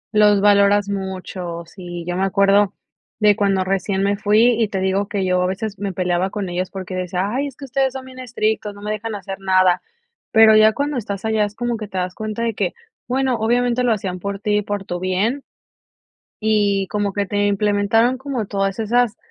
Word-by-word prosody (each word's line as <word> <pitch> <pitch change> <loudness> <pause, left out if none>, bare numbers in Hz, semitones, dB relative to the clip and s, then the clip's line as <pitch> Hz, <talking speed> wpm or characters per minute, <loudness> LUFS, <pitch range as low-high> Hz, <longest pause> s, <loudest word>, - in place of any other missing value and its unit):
Los 210 -1 +5
valoras 200 0 +4
muchos, 185 -3 -5
sí. 175 -2 -8
Yo 175 - -2
me 185 - -1
acuerdo 200 0 +3 0.4
de 210 -1 +5
cuando 195 -2 +1
recién 195 +1 -1
me 200 +1 +2
fui, 210 +2 +3 0.2
y 220 - +3
te 195 -1 -3
digo 190 +1 0
que 195 -3 -1
yo 180 0 +2
a 180 - +1
veces 195 +2 -4
me 200 -1 -2
peleaba 180 0 0
con 195 -2 -4
ellos 180 +1 -2
porque 190 -1 -7
decía: 185 +1 -2
"Ay, 270 +4 -1
es 275 - -10
que 275 - -9
ustedes 270 0 0
son 265 -1 -7
bien 260 0 -12
estrictos, 220 -4 -2
no 205 - -12
me 210 - -3
dejan 215 +1 -4
hacer 195 -1 -7
nada". 185 -2 +3 0.5
Pero 220 -1 +7
ya 215 0 +6
cuando 285 +1 -2
estás 200 -3 -4
allá 220 -1 +2
es 205 0 -8
como 240 0 -2
que 215 -1 -6
te 190 - -7
das 180 0 -2
cuenta 215 +2 -4
de 230 -1 0
que, 195 -3 -1 0.3
bueno, 260 -1 0
obviamente 240 +2 +1
lo 245 - +2
hacían 190 -4 -2
por 200 +2 -4
ti 210 0 +1
y 210 - +1
por 205 -1 -4
tu 175 -1 -4
bien. 200 +9 -1 1.0
Y 205 -3 +2
como 205 -1 -1
que 200 0 -1
te 205 +1 0
implementaron, 210 +4 +2
como 265 -5 -3
todas 195 -1 -1
esas 235 +1 +1
205 Hz, 210 wpm, -20 LUFS, 190-220 Hz, 1.0 s, Pero